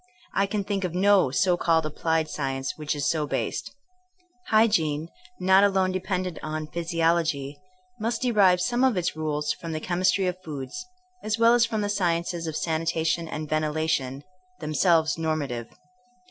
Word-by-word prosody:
I 195 - +2
can 205 0 -2
think 195 -1 -2
of 180 -1 -3
no 195 -4 +4
so 180 +7 +2
called 165 -2 +2
applied 160 +1 0
science 135 -3 -3
which 150 -1 -3
is 145 -2 -1
so 155 -2 0
based. - - -2 0.8
Hygiene, 165 -9 +2 0.3
not 190 +2 +5
alone 190 -2 +2
dependent 185 -2 -3
on 155 0 -4
physiology, 165 -4 0 0.4
must 230 +4 -2
derive 200 -7 +4
some 245 +4 +1
of 255 -6 +3
its 175 -2 -1
rules 150 -1 -1
from 165 -1 -7
the 155 - -2
chemistry 185 +3 +1
of 180 0 -2
foods, 150 - -6 0.4
as 215 0 -1
well 230 +1 +5
as 235 -1 +4
from 220 -2 -2
the - - 0
sci 185 -5 +1
ences 170 -1 -5
of 155 - -3
sanitation 165 0 -1
and 155 -1 -5
ventilation, 155 -3 -1 0.4
themselves 160 +1 +2
normative. 145 -7 -2
165 Hz, 160 wpm, -26 LUFS, 155-190 Hz, 0.8 s, not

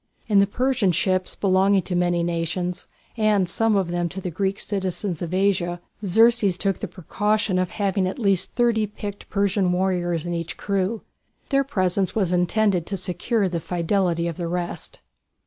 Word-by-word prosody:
In 205 -2 +4
the 200 - +4
Persian 250 -3 +1
ships 185 +1 0
belonging 195 0 +3
to 180 - -3
many 175 -1 +1
nations, 175 +1 -2 0.3
and 210 -4 +3
some 225 +4 +1
of 190 -3 +1
them 175 0 -1
to 190 - -6
the 180 -2 -4
Greek 195 +3 -1
cities 190 -3 -3
of 175 -4 -3
Asia, 185 -2 +1 0.2
Xerxes 215 -1 +4
took 195 -1 0
the 210 - -4
precaution 200 +2 0
of 185 -1 0
having 195 -2 0
at 185 - -4
least 195 -6 +1
thirty 235 -3 +2
picked 205 0 -8
Persian 200 -2 +1
warriors 180 -3 0
in 175 - -2
each 165 -1 -4
crew. 200 +2 -1 0.5
Their 275 -1 +3
presence 190 -7 0
was 190 -5 +1
intended 180 0 +2
to 195 - -2
secure 190 +4 0
the 170 -2 -2
fidelity 170 0 0
of 165 - -4
the 175 - -3
rest. 175 0 -4
190 Hz, 170 wpm, -23 LUFS, 175-205 Hz, 0.5 s, In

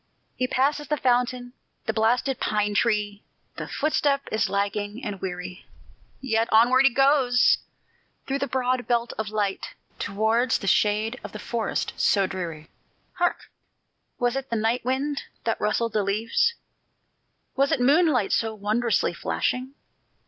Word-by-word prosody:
He 255 - -1
passes 280 +3 0
the 300 - 0
fountain, 245 -1 0 0.3
the 220 - -1
blasted 235 +4 +1
pine 210 -1 0
tree; 205 -1 0 0.3
The - - -5
footstep 285 -2 +1
is 215 -2 +1
lagging 205 +4 -2
and 200 -3 -5
weary; 180 0 -6 0.5
Yet 225 -3 0
onward 245 +4 +5
he - - +7
goes, 270 -1 +4 0.7
through 275 +1 -2
the 280 - -1
broad 255 -1 -1
belt 240 -1 0
of 220 -1 -2
light, 205 -2 -2 0.2
Towards 220 +4 +1
the - - -8
shade 215 +5 +1
of - - -8
the - - -5
forest 235 -2 -2
so 195 -2 +3
dreary. 170 -5 -6 0.5
Hark! 350 0 -1 0.7
was 245 0 0
it 270 0 -4
the 235 - -1
night 225 +3 0
wind 275 +3 -1 0.2
that 225 - -1
rustled 220 +1 0
the 215 - +2
leaves? 225 - +1 1.0
Was 275 +1 +2
it - - +2
moonlight 275 - +3
so 225 -1 0
wondrously 215 +3 0
flashing? 255 +2 -2
235 Hz, 140 wpm, -25 LUFS, 210-260 Hz, 1.0 s, he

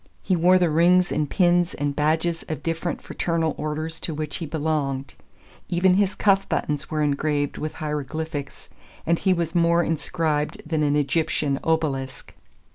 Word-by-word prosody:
He 190 - +1
wore 180 +2 +5
the 175 -3 +2
rings 175 +3 +4
and 150 -2 0
pins 175 -1 +2
and 145 0 -2
badges 160 +3 +1
of 155 -4 -4
different 165 +1 -3
fraternal 165 -2 -1
orders 155 +2 -3
to 160 - -3
which 150 -1 -4
he 165 - -5
belonged. 145 -3 -2 0.6
Even 180 +1 +3
his 195 0 +2
cuff 195 -1 +2
buttons 150 -1 -2
were 155 -1 0
engraved 145 0 0
with 155 0 -4
hieroglyphics, 150 0 -4 0.4
and 170 +1 +2
he 190 - +2
was 170 -2 0
more 170 0 +3
inscribed 155 -2 -1
than 160 -1 0
an 145 -1 +2
Egyptian 150 -1 0
obelisk. 140 -5 -2
160 Hz, 155 wpm, -24 LUFS, 150-170 Hz, 0.6 s, wore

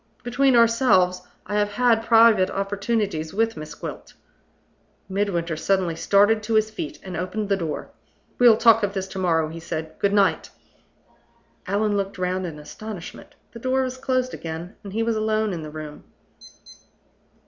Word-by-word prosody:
Between 250 +2 +2
ourselves, 225 -6 +4 0.2
I 205 +2 -1
have 205 0 0
had 230 0 +3
private 225 -5 +5
opportunities 195 -4 -2
with 225 +1 +1
Miss 155 0 -8
Gwilt - - -8 0.5
" - - -40
Midwinter 175 -5 -1
suddenly 180 +1 0
started 205 +6 +3
to 220 +1 -2
his 215 0 +2
feet, 310 +7 -6
and 185 -2 -7
opened 185 +5 -3
the 200 - +3
door. 165 -5 -5 0.5
"We'll 240 -3 +7
talk 230 -1 +5
of 205 -1 -2
this 190 0 -2
to 190 - -6
morrow," 165 -4 +1
he 165 +1 -8
said. 160 -1 -5
"Good 200 - +2
night." 200 -1 +2 1.2
Allan 205 +2 +1
looked 195 0 -3
round 185 0 -1
in 155 -3 -8
astonishment. 180 +5 -9 0.2
The 230 - -10
door 260 +2 +1
was 255 0 -4
closed 255 -1 -1
again, 165 +4 -7
and 200 - -8
he 225 +3 -1
was 230 0 0
alone 215 -1 0
in 170 - -5
the 155 - -7
room. 150 -1 -9
200 Hz, 165 wpm, -23 LUFS, 180-225 Hz, 1.2 s, We'll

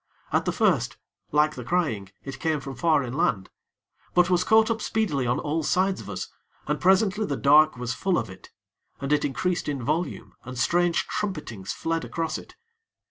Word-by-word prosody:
At - - +2
the - - +1
first, - - +1 0.3
like 150 +1 +3
the 125 - -7
crying, 115 - -1
it 135 - -7
came 160 -2 0
from 135 0 -7
far 155 +1 +2
inland; 120 - -1 0.6
but 180 +1 +4
was 180 0 +3
caught 220 +2 +4
up 225 -1 -2
speedily 160 - 0
on 125 - +1
all 155 +2 -1
sides 185 +5 +1
of - - -10
us, - - -4 0.4
and - - -2
presently 195 +3 +3
the 140 -9 -2
dark 150 0 +5
was 125 0 -3
full 190 -3 0
of 115 - -1
it. 95 - -13 0.5
And 140 +2 -1
it 150 - +2
increased 170 +4 -1
in 140 -4 -3
volume, 160 +5 -2
and 130 0 -8
strange 175 +6 +2
trumpetings 150 - -4
fled 165 0 -2
across 165 -1 -3
it. - - -15
155 Hz, 185 wpm, -26 LUFS, 130-180 Hz, 0.6 s, dark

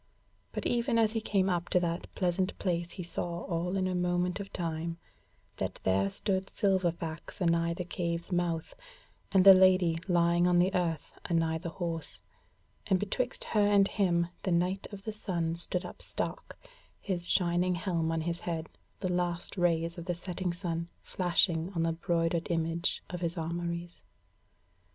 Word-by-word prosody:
But - - -4
even 240 0 +1
as 220 -2 +4
he 225 0 -1
came 195 -3 +1
up 175 -2 0
to 180 - +4
that 170 0 -2
pleasant 185 +1 0
place 175 -2 -1
he 185 - -5
saw 170 0 -3
all 180 +2 -1
in 185 -1 +1
a 185 - -1
moment 180 +1 0
of 200 -1 -6
time; 165 -1 -3 0.6
that - - -3
there 95 +1 +2
stood 190 - -1
Silverfax 175 -5 -1
anigh 170 -1 +2
the 180 - -4
Cave's 170 0 -3
mouth, 175 -2 -1 0.6
and 190 -1 +5
the 195 - +12
Lady 185 -3 +5
lying 175 -1 +3
on 180 -1 +4
the 180 +2 +3
earth 165 -4 -1
anigh 165 -1 +1
the 170 +1 -4
horse; 165 -2 -3 0.7
and 190 -3 +3
betwixt 240 +6 -2
her 215 - +1
and 205 -1 +5
him 175 -5 +1
the 185 - -1
Knight 180 +3 +1
of 200 -1 -8
the 220 - -4
Sun 170 -6 -2
stood 180 +1 -1
up - - -9
stark, - - -4 0.4
his 175 -3 -2
shining 180 0 +2
helm 170 -2 -1
on 165 0 0
his 170 +1 -2
head, 165 -2 -3 0.3
the 185 -2 0
last 175 -1 -1
rays 170 -1 +1
of 170 - -7
the 175 -1 -1
setting 180 +1 -3
sun 170 -1 -3
flashing 175 -1 +1
in 165 - +1
the 165 0 +1
broidered 165 0 0
image 165 +1 0
of 180 -1 -5
his 170 +1 -2
armouries. 170 +1 -4
175 Hz, 170 wpm, -31 LUFS, 170-185 Hz, 0.7 s, the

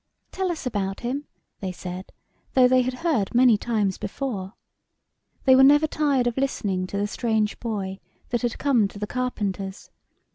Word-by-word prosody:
" - - -49
Tell 375 -1 -1
us 320 -5 -5
about 195 -5 -2
him," 270 +5 -3 0.3
they 190 -2 -3
said, 180 +1 -7 0.4
though 255 -1 +7
they 255 0 +4
had 255 0 -2
heard 235 - +1
many 245 -2 +6
times 205 -3 -1
before. 200 -6 -4 0.9
They 260 -1 +7
were 265 - +7
never 290 +3 +6
tired 290 -5 +1
of 240 0 -1
listening 195 -9 -1
to 200 - -4
the 205 - +1
strange 220 0 -1
boy 200 -4 -4 0.3
that 240 -2 0
had 240 -1 -1
come 250 -8 +3
to 200 - -12
the 210 - -3
carpenter's. 205 -6 -3
235 Hz, 175 wpm, -25 LUFS, 200-260 Hz, 0.9 s, though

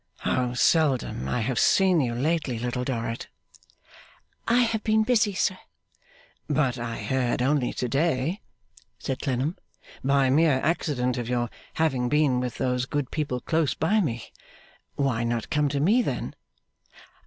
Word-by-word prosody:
'How 125 -1 0
seldom 130 - +2
I 120 - 0
have 120 +2 -1
seen 185 -4 +4
you 120 -3 -1
lately, 145 -1 0
Little 125 +2 -2
Dorrit!' 115 -2 -3 1.2
'I 240 +2 +4
have 225 -2 -1
been 220 0 +3
busy, 220 -3 +2
sir.' 185 0 0 0.9
'But 135 -4 +1
I 115 -1 -4
heard 125 +2 0
only 135 -2 +1
to 125 - -2
day,' 155 - 0 0.6
said 135 -2 -4
Clennam, 135 +4 -1 0.5
'by 135 -1 +3
mere 150 -2 +4
accident, 130 -6 0
of 120 -1 -4
your 120 -1 -1 0.2
having 135 -6 +1
been 145 -3 +2
with 125 -1 -3
those 125 -1 0
good 145 -4 -2
people 140 -5 -2
close 160 -3 0
by 205 +8 +2
me. 120 - -3 0.6
Why 130 -5 0
not 115 -1 -2
come 150 -1 +2
to 140 0 -1
me, 205 - +4
then? - - -3
135 Hz, 145 wpm, -26 LUFS, 125-160 Hz, 1.2 s, seen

